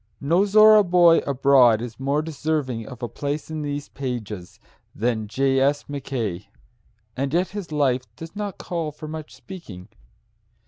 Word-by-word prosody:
No 170 Hz, +8 st, +2 dB
Zorra 215 Hz, +1 st, +7 dB
boy 175 Hz, -2 st, +5 dB
abroad 135 Hz, -4 st, +5 dB
is 115 Hz, 0 st, -7 dB
more 140 Hz, +3 st, 0 dB
deserving 145 Hz, -7 st, -2 dB
of 125 Hz, -2 st, -10 dB
a -, -, -1 dB
place 145 Hz, +6 st, -4 dB
in 155 Hz, -1 st, -4 dB
these 145 Hz, 0 st, -4 dB
pages 110 Hz, -9 st, -6 dB, 0.4 s
than 110 Hz, -1 st, -1 dB
J. 135 Hz, +4 st, +1 dB
S. 140 Hz, +2 st, +1 dB
Mackay, 120 Hz, -9 st, -4 dB, 0.7 s
and 135 Hz, +2 st, -2 dB
yet 175 Hz, +4 st, +1 dB
his 200 Hz, -5 st, -7 dB
life 130 Hz, -4 st, +1 dB
does 165 Hz, +3 st, -10 dB
not 205 Hz, -2 st, -4 dB
call 165 Hz, -3 st, -4 dB
for 150 Hz, +1 st, -10 dB
much 155 Hz, 0 st, -8 dB
speaking. 115 Hz, -, -11 dB
140 Hz, 150 wpm, -23 LUFS, 125-160 Hz, 0.7 s, Zorra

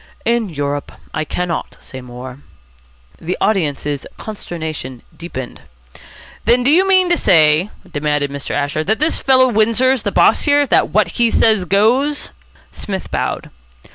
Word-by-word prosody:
"In 235 Hz, -2 st, +1 dB
Europe. 145 Hz, -2 st, -4 dB, 0.2 s
I 155 Hz, -, -1 dB
cannot 175 Hz, +1 st, -4 dB
say 130 Hz, -, -10 dB
more." 125 Hz, +1 st, -10 dB, 0.8 s
The 175 Hz, +3 st, -4 dB
audience's 150 Hz, -7 st, -1 dB
consternation 160 Hz, -, -7 dB
deepened. 130 Hz, -7 st, -8 dB, 0.8 s
"Then, 245 Hz, +1 st, +3 dB
do 270 Hz, -, +4 dB
you 370 Hz, +5 st, +4 dB
mean 375 Hz, -1 st, +4 dB
to 345 Hz, -, +3 dB
say," 160 Hz, +1 st, +4 dB, 0.2 s
demanded 145 Hz, -1 st, -1 dB
Mr. 140 Hz, 0 st, -7 dB
Asher, 145 Hz, +2 st, -1 dB
"that 220 Hz, +6 st, 0 dB
this 310 Hz, +4 st, +1 dB
fellow 260 Hz, -1 st, +4 dB
Windsor's 230 Hz, +3 st, +2 dB
the 205 Hz, -, -2 dB
boss 215 Hz, -, +3 dB
here, 290 Hz, 0 st, +4 dB
that -, -, +2 dB
what 210 Hz, -5 st, +2 dB
he 235 Hz, -1 st, +4 dB
says 220 Hz, -4 st, +2 dB
goes?" 245 Hz, +10 st, +1 dB, 0.4 s
Psmith 195 Hz, -2 st, -6 dB
bowed. -, -, -3 dB
190 Hz, 140 wpm, -17 LUFS, 145-240 Hz, 0.8 s, do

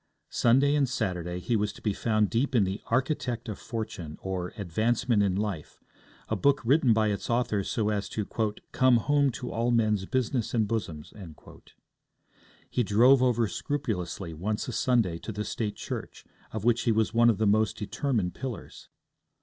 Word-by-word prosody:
Sunday 135 Hz, +4 st, +4 dB
and 140 Hz, -3 st, +2 dB
Saturday 90 Hz, -8 st, -2 dB
he 115 Hz, +6 st, -1 dB
was 105 Hz, -1 st, 0 dB
to -, -, -13 dB
be 105 Hz, -, -1 dB
found 110 Hz, 0 st, +1 dB
deep 130 Hz, +4 st, 0 dB
in 110 Hz, -, +5 dB
The 95 Hz, +2 st, -3 dB
Architect 125 Hz, -2 st, -1 dB
of 105 Hz, -, -5 dB
Fortune; 110 Hz, -9 st, -6 dB
or, 90 Hz, -2 st, -3 dB
Advancement 110 Hz, +4 st, +1 dB
in 95 Hz, -2 st, +1 dB
Life, 100 Hz, -6 st, -4 dB, 0.5 s
a -, -, -1 dB
book 140 Hz, 0 st, +3 dB
written 135 Hz, 0 st, +4 dB
by 110 Hz, -1 st, +3 dB
its 100 Hz, -, -3 dB
author 115 Hz, -4 st, +1 dB
so 105 Hz, +2 st, -1 dB
as 105 Hz, -1 st, -2 dB
to 105 Hz, -, -3 dB, 0.5 s
'come 130 Hz, -2 st, +4 dB
home 145 Hz, +4 st, +2 dB
to 125 Hz, -, -6 dB
all 115 Hz, +2 st, 0 dB
men's 110 Hz, -5 st, +2 dB
business 125 Hz, -2 st, -1 dB
and 110 Hz, -3 st, +2 dB
bosoms.' 85 Hz, -9 st, -4 dB, 1.5 s
He 125 Hz, -, 0 dB
drove 120 Hz, +5 st, +5 dB
over 120 Hz, -3 st, +2 dB
scrupulously 100 Hz, -, -3 dB
once 105 Hz, +7 st, -3 dB
a -, -, -3 dB
Sunday 115 Hz, -8 st, +1 dB
to 110 Hz, -, -6 dB
the 105 Hz, 0 st, -4 dB
State 105 Hz, -3 st, -3 dB
church, -, -, -7 dB, 0.3 s
of 110 Hz, -2 st, -4 dB
which 120 Hz, 0 st, +3 dB
he 120 Hz, -, +2 dB
was 110 Hz, 0 st, +1 dB
one 120 Hz, +1 st, +5 dB
of 110 Hz, -, +2 dB
the 110 Hz, -, +1 dB
most 110 Hz, +1 st, +2 dB
determined 110 Hz, -2 st, -1 dB
pillars. 130 Hz, -5 st, -7 dB
110 Hz, 175 wpm, -28 LUFS, 100-120 Hz, 1.5 s, in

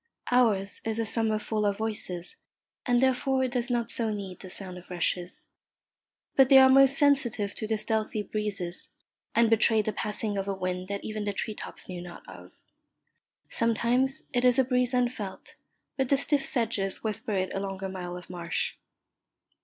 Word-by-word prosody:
Ours 215 Hz, -6 st, +2 dB
is 225 Hz, 0 st, -2 dB
a 230 Hz, -, 0 dB
summer 220 Hz, 0 st, +1 dB
full 215 Hz, 0 st, -2 dB
of 200 Hz, -1 st, +1 dB
voices, 210 Hz, -5 st, -3 dB, 0.5 s
and 245 Hz, -1 st, +4 dB
therefore 260 Hz, 0 st, +2 dB
it 255 Hz, -, -1 dB
does 245 Hz, 0 st, -1 dB
not 240 Hz, -2 st, +1 dB
so 230 Hz, -2 st, +1 dB
need 195 Hz, -3 st, -6 dB
the 185 Hz, -, -9 dB
sound 185 Hz, -1 st, -4 dB
of 180 Hz, -, -18 dB
rushes; 180 Hz, 0 st, -2 dB, 0.9 s
but 265 Hz, -1 st, +6 dB
they 270 Hz, -, +9 dB
are 265 Hz, 0 st, +8 dB
most 270 Hz, 0 st, +6 dB
sensitive 245 Hz, -8 st, +2 dB
to 215 Hz, -, -4 dB
the 220 Hz, 0 st, 0 dB
stealthy 215 Hz, -1 st, -1 dB
breezes, 200 Hz, -4 st, -3 dB, 0.5 s
and 235 Hz, 0 st, +5 dB
betray 225 Hz, 0 st, +4 dB
the 215 Hz, -, -2 dB
passing 210 Hz, -1 st, -2 dB
of 195 Hz, -, -3 dB
a 195 Hz, -, -1 dB
wind 185 Hz, 0 st, -3 dB
that 200 Hz, 0 st, -4 dB
even 215 Hz, -1 st, -4 dB
the 205 Hz, -1 st, -2 dB
tree 215 Hz, +2 st, -3 dB
tops -, -, -8 dB
knew 180 Hz, -2 st, -6 dB
not 175 Hz, -1 st, -11 dB
of. 90 Hz, -1 st, -12 dB, 1.0 s
Sometimes 235 Hz, +4 st, +1 dB
it 245 Hz, -1 st, +1 dB
is 250 Hz, 0 st, +5 dB
a 265 Hz, -, +5 dB
breeze 250 Hz, 0 st, +1 dB
unfelt, 240 Hz, -6 st, -2 dB, 0.4 s
but 265 Hz, -2 st, 0 dB
the 275 Hz, -, +4 dB
stiff 280 Hz, 0 st, +2 dB
sedges 220 Hz, -7 st, -1 dB
whisper 215 Hz, 0 st, -2 dB
it 185 Hz, -1 st, -1 dB
along 195 Hz, 0 st, -4 dB
a -, -, -1 dB
mile 180 Hz, -2 st, -6 dB
of 180 Hz, -, -11 dB
marsh. 175 Hz, -2 st, -3 dB
215 Hz, 180 wpm, -28 LUFS, 190-245 Hz, 1.0 s, they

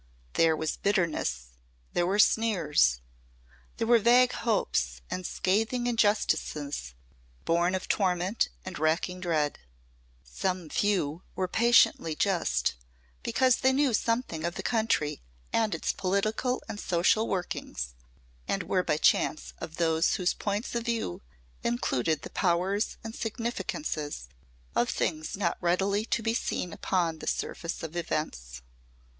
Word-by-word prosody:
There 165 Hz, -1 st, +4 dB
was 155 Hz, 0 st, -2 dB
bitterness, 160 Hz, -, 0 dB, 0.4 s
there 175 Hz, -, +1 dB
were 195 Hz, +2 st, +1 dB
sneers, 165 Hz, -, +3 dB, 0.8 s
there -, -, 0 dB
were 235 Hz, 0 st, +6 dB
vague 245 Hz, +3 st, +5 dB
hopes 65 Hz, -, 0 dB
and 185 Hz, -1 st, -3 dB
scathing 225 Hz, +6 st, 0 dB
injustices 160 Hz, -, 0 dB, 0.5 s
born 175 Hz, +2 st, +2 dB
of 185 Hz, -, -4 dB
torment 185 Hz, +1 st, +1 dB, 0.2 s
and -, -, -6 dB
racking 165 Hz, +4 st, 0 dB
dread. 160 Hz, -5 st, 0 dB, 0.6 s
Some 175 Hz, -, -3 dB
few 180 Hz, -4 st, 0 dB
were 185 Hz, -, 0 dB
patiently 220 Hz, -7 st, +4 dB
just, 165 Hz, -, +1 dB, 0.5 s
because 255 Hz, -, +3 dB
they 265 Hz, -, +3 dB
knew 270 Hz, -1 st, +2 dB
something 230 Hz, -8 st, 0 dB
of 170 Hz, +1 st, -2 dB
the -, -, -5 dB
country 220 Hz, -, 0 dB, 0.3 s
and 220 Hz, -2 st, +2 dB
its -, -, -1 dB
political 215 Hz, +7 st, 0 dB
and 205 Hz, -, -6 dB
social 185 Hz, +5 st, +2 dB
workings 65 Hz, -, -3 dB, 0.5 s
and -, -, 0 dB
were -, -, +1 dB
by -, -, 0 dB
chance -, -, +2 dB
of 160 Hz, -, -7 dB
those 165 Hz, -1 st, +2 dB
whose 185 Hz, -3 st, +1 dB
points 205 Hz, +3 st, -3 dB
of 235 Hz, -1 st, -2 dB
view 230 Hz, -, -2 dB, 0.4 s
included 125 Hz, +5 st, 0 dB
the -, -, -8 dB
powers 190 Hz, +4 st, 0 dB
and 225 Hz, 0 st, -6 dB
significances 225 Hz, -, -3 dB, 0.5 s
of 120 Hz, -, +2 dB
things 155 Hz, +1 st, -2 dB
not 175 Hz, -4 st, 0 dB
readily 195 Hz, +4 st, +1 dB
to 230 Hz, -, -1 dB
be 225 Hz, 0 st, +1 dB
seen 180 Hz, -6 st, -2 dB
upon 170 Hz, -4 st, 0 dB
the -, -, -8 dB
surface 165 Hz, 0 st, -3 dB
of 160 Hz, +1 st, -6 dB
events. 60 Hz, -, -3 dB
180 Hz, 130 wpm, -28 LUFS, 155-220 Hz, 0.8 s, were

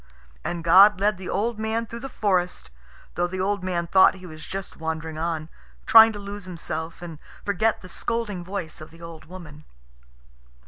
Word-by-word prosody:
And 170 Hz, -1 st, -3 dB
God 195 Hz, +4 st, +7 dB
led 205 Hz, -1 st, +1 dB
the 190 Hz, -, -7 dB
old 220 Hz, +3 st, -1 dB
man 220 Hz, +1 st, -1 dB
through 230 Hz, +1 st, -8 dB
the 270 Hz, +3 st, -7 dB
forest, 180 Hz, -, -1 dB, 0.4 s
though 175 Hz, 0 st, 0 dB
the 185 Hz, +1 st, -5 dB
old 200 Hz, 0 st, -1 dB
man 175 Hz, -2 st, -1 dB
thought 190 Hz, +2 st, +5 dB
he 185 Hz, -1 st, -12 dB
was 155 Hz, -3 st, -10 dB
just 195 Hz, 0 st, -6 dB
wandering 160 Hz, 0 st, -4 dB
on, 160 Hz, -1 st, -2 dB, 0.4 s
trying 225 Hz, 0 st, +9 dB
to -, -, -7 dB
lose 200 Hz, -1 st, -7 dB
himself 165 Hz, -2 st, -5 dB
and 165 Hz, -3 st, -8 dB, 0.3 s
forget 215 Hz, +3 st, +1 dB
the -, -, -9 dB
scolding 210 Hz, -3 st, -3 dB
voice 175 Hz, -4 st, -6 dB
of 155 Hz, -, -10 dB
the 165 Hz, +1 st, -15 dB
old 165 Hz, -1 st, -10 dB
woman. 155 Hz, -3 st, -11 dB
185 Hz, 180 wpm, -24 LUFS, 165-205 Hz, 0.4 s, trying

